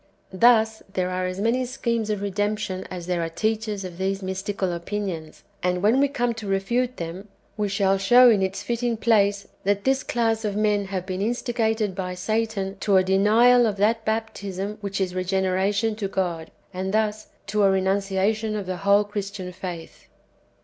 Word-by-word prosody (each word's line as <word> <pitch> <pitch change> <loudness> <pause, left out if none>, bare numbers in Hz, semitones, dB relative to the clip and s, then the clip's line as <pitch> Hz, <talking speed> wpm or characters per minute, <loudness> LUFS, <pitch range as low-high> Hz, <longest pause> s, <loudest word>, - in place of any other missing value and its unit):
Thus 220 +1 +4
there 185 -2 -1
are 185 0 -1
as 185 +1 -5
manv 230 +5 +1
sciiemes 235 -3 -2
of 205 -1 -2
"redemption" 205 -1 -2
as 180 -2 -6
there 180 -1 -1
are 165 - -2
teachers 215 +2 -2
of 180 -1 -8
these 195 +1 -1
mystical 190 0 -2
opinions. 170 -3 -5 0.2
And 180 0 0
when 225 +6 +4
we 280 - +4
come 245 -3 -1
to 210 - -7
refute 240 +6 0
them, 175 +4 -6 0.3
we 210 -1 -1
shall 195 -1 +2
show 245 +6 +7
in 215 -5 +5
its 190 0 -2
fitting 235 -1 -1
place, 205 -3 +2 0.2
that 200 0 +1
this 270 0 +2
class 225 -2 0
of 205 -2 -2
men 210 -1 +1
have 190 -2 -4
been 185 0 -4
instigated 225 -2 0
by 180 -1 -4
Satan 205 0 -2
to 200 -2 +3
a 185 - +5
denial 225 +6 +5
of 205 -2 -2
that 220 +3 +2
baptism 210 -2 -3
which 200 -1 -3
is 185 -2 -1
regeneration 190 +3 0
to 205 -3 -2
God, 175 -4 -2 0.2
and 190 +2 -2
thus 215 0 0 0.2
to 210 +1 0
a 200 - +5
renunciation 195 +3 0
of 205 -2 -3
the 185 0 -3
whole 200 +2 +4
[Christian] 200 -2 -5
faith. 175 -3 -8
200 Hz, 175 wpm, -24 LUFS, 190-220 Hz, 0.3 s, show